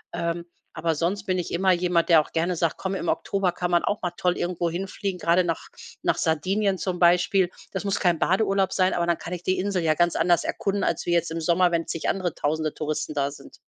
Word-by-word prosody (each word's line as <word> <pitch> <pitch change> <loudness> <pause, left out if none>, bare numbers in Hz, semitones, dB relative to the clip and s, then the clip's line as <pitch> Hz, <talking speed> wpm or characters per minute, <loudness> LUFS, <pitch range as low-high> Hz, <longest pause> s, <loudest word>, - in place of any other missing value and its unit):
Ähm, 170 0 -2 0.3
aber 165 0 0
sonst 175 +6 -1
bin 185 -2 0
ich 175 - -4
immer 190 +2 +2
jemand, 175 -1 +1
der 165 -2 +7
auch - - -11
gerne 170 +2 0
sagt: 165 -1 0
„Komm, 190 0 -3
im 185 - -3
Oktober 195 0 0
kann 175 0 -3
man 175 -1 +3
auch 205 - -1
mal 180 - -1
toll 180 0 0
irgendwo 175 -1 -1
hinfliegen“, 190 +2 -4
gerade 175 +1 +3
nach 165 -3 -3 0.3
nach - - +1
Sardinien 190 +5 +1
zum 180 -1 -3
Beispiel. 180 +2 +4 0.2
Das 190 - -4
muss 200 -1 -1
kein 175 -4 +2
Badeurlaub 195 +1 +2
sein, 185 -1 +2
aber 170 -1 0
dann 170 -1 +2
kann 175 - -7
ich 175 - -5
die 185 +1 +1
Insel 190 -1 -1
ja 155 -1 +2
ganz 175 +1 +2
anders 175 -1 +3
erkunden 200 0 -1
als 170 - -1
wie 175 - +2
jetzt 170 -1 +1
im 165 0 -3
Sommer, 175 +2 +3
wenn 165 -1 -1
zig 165 - -2
andere 180 -4 -1
1000e 155 +1 -1
Touristen 155 0 -3
da 140 0 0
sind. 145 - -13
175 Hz, 235 wpm, -25 LUFS, 165-185 Hz, 0.3 s, der